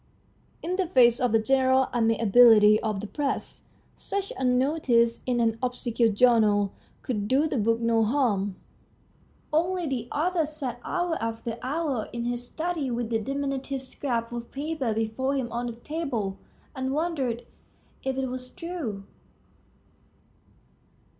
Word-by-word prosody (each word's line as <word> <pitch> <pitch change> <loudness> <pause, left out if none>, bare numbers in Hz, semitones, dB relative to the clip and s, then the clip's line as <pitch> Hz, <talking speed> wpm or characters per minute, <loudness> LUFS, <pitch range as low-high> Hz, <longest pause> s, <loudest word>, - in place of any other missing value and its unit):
In 360 +3 -2
the 380 -2 0
face 245 -6 +5
of 250 -3 +1
the 225 - +5
general 260 +3 +3
amiability 225 -2 +6
of 215 -3 -2
the - - -5
Press, 280 +5 -3 0.3
such 400 0 -4
a 265 - -4
notice 250 -2 +2
in 245 -1 +1
an 225 -1 +1
obscure 245 -2 +1
journal 210 -3 +3 0.3
could 210 -5 -2
do 275 +7 +3
the 275 - -1
book 225 +2 +2
no 230 -1 +2
harm. 210 -6 +1 1.0
Only 350 +3 +1
the 255 -5 -3
author 330 +1 +1
sat 275 -6 -5
hour 350 -2 -1
after 230 0 -4
hour 275 -3 -2
in 235 0 -3
his 240 0 -2
study 315 +1 -3
with 240 -1 -3
that 225 -2 0
diminutive 275 0 -3
scrap 240 -3 -3
of 235 -1 -6
paper 285 -3 -2
before 225 +5 -1
him 250 -4 -2
on 240 +1 -2
the 235 - -5
table, 240 -8 -3 0.4
and 260 0 -2
wondered 280 -7 -1 0.6
if 265 0 -2
it 265 - 0
was 255 0 -6
true. 310 - -5
250 Hz, 140 wpm, -26 LUFS, 230-280 Hz, 1.0 s, amiability